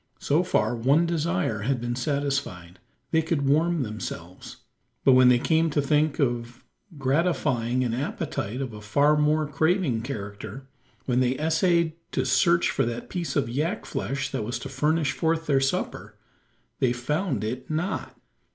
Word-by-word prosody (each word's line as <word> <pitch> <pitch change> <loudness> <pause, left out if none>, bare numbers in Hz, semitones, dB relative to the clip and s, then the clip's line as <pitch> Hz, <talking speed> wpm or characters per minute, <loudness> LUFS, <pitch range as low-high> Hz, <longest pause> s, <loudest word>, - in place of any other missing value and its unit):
So 145 +5 +2
far 120 -11 +1
one 135 +8 +3
desire 170 - -1
had 125 +4 -1
been 120 0 -3
satisfied. 130 - -2 0.3
They 160 - +3
could 155 -3 -1
warm 160 +2 +2
themselves. 100 -5 -7 0.5
But 135 - +7
when 130 -1 +7
they 125 - +6
came 160 +5 +2
to 150 - 0
think 150 +1 +2
of 120 -3 -2 0.3
gratifying 135 -4 +1
an 120 -2 -1
appetite 130 -3 -3
of 130 -4 -4
a 105 - -9
far 140 +8 +3
more 150 +1 +2
craving 155 - +1
character 115 +1 -7 0.4
when 125 -1 +1
they 130 0 +1
essayed 165 +1 +2 0.2
to - - 0
search 170 -3 +3
for - - +1
that 120 0 -5
piece 175 -2 -3
of 140 -5 +1
yak 155 - -2
flesh 140 0 -3
that - - -2
was 120 +4 -3
to - - -6
furnish 150 +2 +1
forth 165 +2 0
their 140 -3 +2
supper 135 - -2 0.6
they 125 -2 +2
found 135 - -2
it 125 +4 -4
not! 165 +5 -3
140 Hz, 160 wpm, -26 LUFS, 120-160 Hz, 0.6 s, But